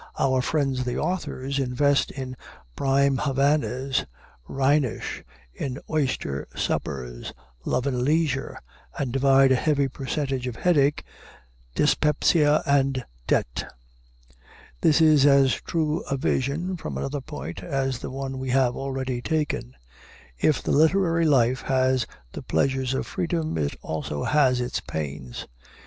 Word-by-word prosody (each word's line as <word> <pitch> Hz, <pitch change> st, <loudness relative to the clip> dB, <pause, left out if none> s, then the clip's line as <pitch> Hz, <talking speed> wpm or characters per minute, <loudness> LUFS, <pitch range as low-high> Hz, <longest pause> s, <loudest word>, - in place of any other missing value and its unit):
Our 130 Hz, -1 st, +2 dB
friends 135 Hz, -2 st, 0 dB
the 125 Hz, -1 st, -2 dB
authors 140 Hz, -7 st, -2 dB
invest 135 Hz, +2 st, +2 dB
in 130 Hz, -2 st, -6 dB, 0.4 s
prime 135 Hz, 0 st, +2 dB
Havanas, 135 Hz, -1 st, +1 dB, 0.4 s
Rhenish, 135 Hz, -1 st, 0 dB, 0.3 s
in 130 Hz, -2 st, -4 dB
oyster 130 Hz, -, -1 dB
suppers, 60 Hz, -3 st, -3 dB, 0.3 s
love 125 Hz, -, 0 dB
and 130 Hz, -3 st, 0 dB
leisure, 145 Hz, -1 st, 0 dB, 0.4 s
and 130 Hz, -4 st, -2 dB
divide 135 Hz, 0 st, +5 dB
a -, -, +6 dB
heavy 140 Hz, +1 st, +1 dB
percentage 135 Hz, -1 st, -3 dB
of 125 Hz, -, -4 dB
headache, 150 Hz, -2 st, +2 dB, 0.7 s
dyspepsia, 150 Hz, 0 st, +3 dB
and 135 Hz, -3 st, +1 dB, 0.2 s
debt. -, -, -1 dB, 1.1 s
This 160 Hz, +1 st, +4 dB
is 155 Hz, -3 st, +6 dB
as 140 Hz, -2 st, +5 dB
true 155 Hz, -2 st, -1 dB
a 140 Hz, -, 0 dB
view, 160 Hz, +6 st, -1 dB
from -, -, -5 dB
another 140 Hz, +1 st, -3 dB
point, 80 Hz, -, -7 dB
as 135 Hz, +5 st, -2 dB
the -, -, -6 dB
one 135 Hz, 0 st, -5 dB
we 130 Hz, 0 st, -4 dB
have 125 Hz, -1 st, +2 dB
already 130 Hz, -2 st, -3 dB
taken. 145 Hz, -, -2 dB, 0.6 s
If 155 Hz, -, +2 dB
the -, -, -1 dB
literary 165 Hz, +2 st, +3 dB
life 130 Hz, -4 st, +3 dB
has 130 Hz, -2 st, +1 dB, 0.2 s
the -, -, -7 dB
pleasures 130 Hz, +8 st, 0 dB
of -, -, -2 dB
freedom, 170 Hz, -, -2 dB
it -, -, +1 dB
has -, -, -13 dB
also 75 Hz, -2 st, -3 dB
its 130 Hz, -4 st, +2 dB
pains. 70 Hz, -5 st, -6 dB
135 Hz, 130 wpm, -25 LUFS, 130-150 Hz, 1.1 s, a